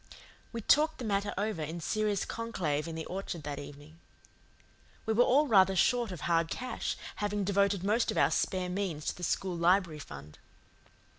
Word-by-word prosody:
We 230 - -4
talked 310 +7 +3
the 250 - -6
matter 200 -1 0
over 205 -4 -1
in 160 +3 -4
serious 210 +3 0
conclave 170 -10 -2
in 165 - -5
the 160 - -4
orchard 180 -3 -5
that 145 0 -4
evening. 145 +3 -11 1.1
We 220 - +1
were 240 +3 +5
all 280 +5 +4
rather 195 -6 +5
short 240 +2 +2
of 180 - -7
hard 165 -1 +1
cash, 255 -1 -3 0.2
having 205 0 -1
devoted 200 -1 +1
most 215 +4 +2
of - - -2
our - - +4
spare 185 -2 0
means 180 -5 -3
to - - -1
the - - -12
school 180 +1 -1
library 170 -2 +2
fund. 75 - -10
190 Hz, 175 wpm, -31 LUFS, 165-215 Hz, 1.1 s, were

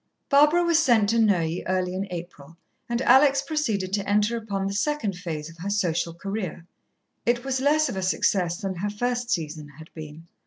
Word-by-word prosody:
Barbara 300 +5 +5
was 335 -2 +3
sent 235 -9 +3
to 230 +1 +2
Neuilly 180 -6 +1
early 185 -1 0
in 195 +2 -3
April, 170 -3 -9 0.3
and 235 +2 -1
Alex 275 +2 +5
proceeded 225 -11 -2
to 200 -1 -1
enter 210 +3 +2
upon 205 -4 -3
the 195 - -2
second 225 -3 -1
phase 165 -4 -5
of 165 0 -13
her 190 +4 -4
social 170 -4 -1
career. 195 -2 -5 0.6
It 240 +2 0
was 265 -1 -1
less 305 +2 +3
of 245 - -4
a 190 - -3
success 185 -2 +1
than 195 -3 -4
her 205 +4 -2
first 245 +3 -2
season 155 -5 -3
had 160 0 -13
been. 155 0 -10
200 Hz, 190 wpm, -25 LUFS, 175-245 Hz, 0.6 s, Barbara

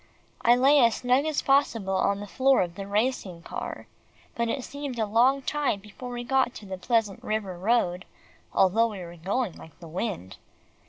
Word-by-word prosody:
I 240 +1 +5
lay 275 +4 +5
as 235 -3 +4
snug 255 +3 +2
as 310 -2 -1
possible 235 -8 +2
on 200 +1 +1
the - - -5
floor 265 +4 +3
of 175 -1 -6
the 195 +2 -7
racing 205 -5 -1
car, - - -6 0.5
but 235 0 -1
it 255 +3 -2
seemed 285 -3 -6
a 220 - +1
long 250 +6 +3
time 290 -9 0
before 210 +5 -10
we 240 0 -5
got 255 -2 0
on 200 - -12
the 190 - -4
Pleasant 225 -2 0
River 215 -4 -2
Road, 180 -2 0 0.5
although 220 +5 +3
we 210 -4 -7
were 170 -1 -9
going 195 +5 -2
like 160 - -14
the 170 - -11
wind. 160 - -4
225 Hz, 190 wpm, -27 LUFS, 190-255 Hz, 0.5 s, I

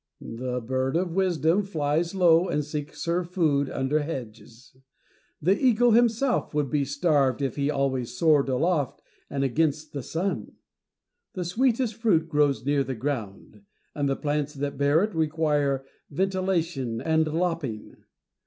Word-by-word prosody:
The 125 +2 -4
bird 130 +4 -1
of 175 0 0
wisdom 180 -1 +2
'flies 165 -2 -1
low, 175 -1 +4
and 150 0 -1
seeks 150 0 -5
her 170 +2 0
food 160 -6 0
under 135 +3 0
hedges: 125 -5 -8 0.6
the 185 +6 +3
eagle 245 0 +3
himself 235 - +2
would 145 -4 0
be 145 -2 +1
starved 140 -2 +1
if 135 -2 -2
he 140 0 0
always 130 -4 -1
soared 150 -4 +3
aloft 145 0 0 0.3
and 140 -1 -2
against 150 +3 0
the 140 - -3
sun. 175 +9 -3 0.8
The 185 -4 -4
sweetest 235 +5 +1
fruit 205 -8 +1
grows 145 -6 +1
near 140 0 +2
the 130 -1 -4
ground, 120 - -5 0.3
and 145 -2 -1
the 135 - +1
plants 150 0 -2
that 140 +1 -3
bear 145 +5 +3
it 215 0 -2
require 150 -4 0 0.2
ventilation 170 -8 -1
and 160 +2 +1
lopping. 160 -8 -3
150 Hz, 145 wpm, -26 LUFS, 135-175 Hz, 0.8 s, low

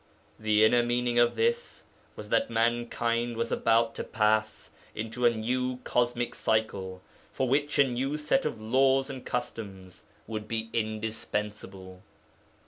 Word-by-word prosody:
The 110 0 +3
inner 120 +2 +5
meaning 120 0 +1
of 120 0 +4
this 470 +1 -1 0.3
was - - -9
that 275 -1 +2
mankind 120 0 0
was 115 0 -1
about 115 0 +2
to - - -4
pass 110 0 0 0.2
into 115 +3 0
a - - +7
new 125 +3 -1
cosmic 120 0 0
cycle, 95 -4 -1 0.3
for 130 - -1
which 145 +3 +1
a 140 - +6
new 135 +4 -1
set 150 - +1
of - - -3
laws 135 +4 +2
and 130 -2 -8
customs 100 -6 -5 0.2
would 110 -1 -5
be 110 0 -3
indispensable. 105 -4 -4
115 Hz, 135 wpm, -28 LUFS, 110-125 Hz, 0.3 s, a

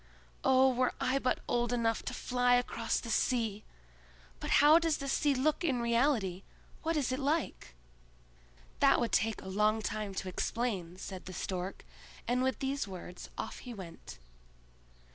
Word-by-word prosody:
"Oh, 265 0 +5
were 255 0 +1
I 265 +2 +1
but 255 - 0
old 240 0 +1
enough 230 -2 +1
to - - -3
fly 245 0 +2
across 235 -2 0
the 230 - -6
sea! 220 -3 0 0.8
But - - -5
how 300 +3 +7
does 330 -2 +1
the 275 - -5
sea 285 +1 +2
look 300 +6 +1
in 270 -7 +1
reality? 235 -6 +1 0.4
What 330 0 0
is 270 -4 0
it 255 - -1
like?" 285 - -2 1.0
"That - - +5
would 235 -2 0
take 220 0 +1
a - - -9
long 210 +3 +2
time 210 -2 -3
to 190 - -3
explain," 185 -3 -2
said 190 -1 -7
the 185 - -6
Stork, 185 +1 -4 0.4
and 245 +1 +1
with 260 0 +1
these 275 -2 -2
words 180 -1 -8
off - - -5
he 245 -2 -8
went. 170 - -10
240 Hz, 160 wpm, -32 LUFS, 200-265 Hz, 1.0 s, how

